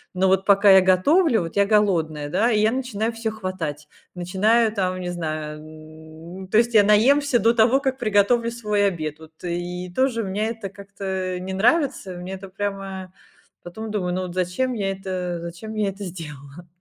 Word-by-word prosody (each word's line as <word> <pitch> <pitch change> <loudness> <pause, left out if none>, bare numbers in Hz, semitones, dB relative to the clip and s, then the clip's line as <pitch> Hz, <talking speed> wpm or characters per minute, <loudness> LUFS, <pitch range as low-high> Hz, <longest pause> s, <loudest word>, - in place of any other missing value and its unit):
Но 190 +1 +2
вот 190 0 +2
пока 200 0 +6
я 190 0 +8
готовлю, 225 - +3
вот 165 -1 -6
я 200 - +5
голодная, 165 -8 +1
да? 210 +9 +2
И 215 - +2
я 215 +1 +3
начинаю 235 -4 -2
всё 225 0 -3
хватать. 185 -8 -5 0.3
Начинаю 210 +6 +2
там, 185 -3 -1
не 180 -1 -4
знаю, 155 -3 -4
м. 155 +3 -12
То 200 - +1
есть 235 +1 +3
я 210 -2 +7
наемся 250 +6 +4
до 230 +1 +3
того, 235 +3 +4
как 265 -1 -2
приготовлю 230 +1 +2
свой 210 -3 0
обед. 155 -5 -4
Вот. 160 0 -14
И 175 +1 -4
тоже 260 -3 +1
меня 200 +2 -2
это 225 -3 -5
как-то 190 -2 -5
не 185 +1 -5
нравится, 235 - +1
мне 180 +2 -7
это 190 0 -8
прямо 195 -1 -5 0.5
потом 220 +5 -7
думаю: 180 -4 -2
"Ну, 185 - -1
вот 180 -1 -6
зачем 185 +8 -1
я 200 -4 -2
это 185 -2 -4
зачем 170 +6 -8
я 210 -2 0
это 195 +1 -8
сделала?" 155 -3 -9
190 Hz, 180 wpm, -23 LUFS, 175-220 Hz, 0.5 s, я